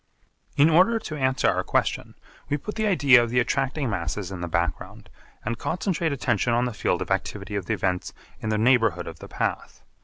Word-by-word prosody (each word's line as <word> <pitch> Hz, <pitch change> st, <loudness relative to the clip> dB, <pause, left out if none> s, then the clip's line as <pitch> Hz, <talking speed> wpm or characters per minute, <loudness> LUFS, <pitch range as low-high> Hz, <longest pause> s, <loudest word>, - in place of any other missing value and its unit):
In 145 Hz, -, +6 dB
order 185 Hz, +8 st, +4 dB
to 195 Hz, -8 st, -6 dB
answer 130 Hz, -2 st, +1 dB
our -, -, +1 dB
question -, -, -1 dB, 0.3 s
we 145 Hz, -, +1 dB
put 210 Hz, +9 st, -6 dB
the 220 Hz, -1 st, -1 dB
idea 140 Hz, -10 st, +6 dB
of 120 Hz, -, -1 dB
the 125 Hz, +1 st, +2 dB
attracting 135 Hz, +3 st, 0 dB
masses 90 Hz, -1 st, -3 dB
in 90 Hz, -2 st, -6 dB
the 85 Hz, -, -3 dB
background 85 Hz, -1 st, -3 dB, 0.3 s
and 115 Hz, +2 st, -3 dB
concentrate 170 Hz, -2 st, -1 dB
attention 120 Hz, -3 st, 0 dB
on 120 Hz, +1 st, +2 dB
the 125 Hz, -, -3 dB
field -, -, 0 dB
of -, -, -12 dB
activity 105 Hz, -, -2 dB
of 95 Hz, -3 st, -3 dB
the 115 Hz, -, 0 dB
events 90 Hz, -2 st, -2 dB, 0.3 s
in 110 Hz, -, -4 dB
the 110 Hz, -, +1 dB
neighbourhood 115 Hz, -6 st, +3 dB
of -, -, -9 dB
the -, -, -10 dB
path. -, -, -4 dB
120 Hz, 205 wpm, -25 LUFS, 100-145 Hz, 0.3 s, In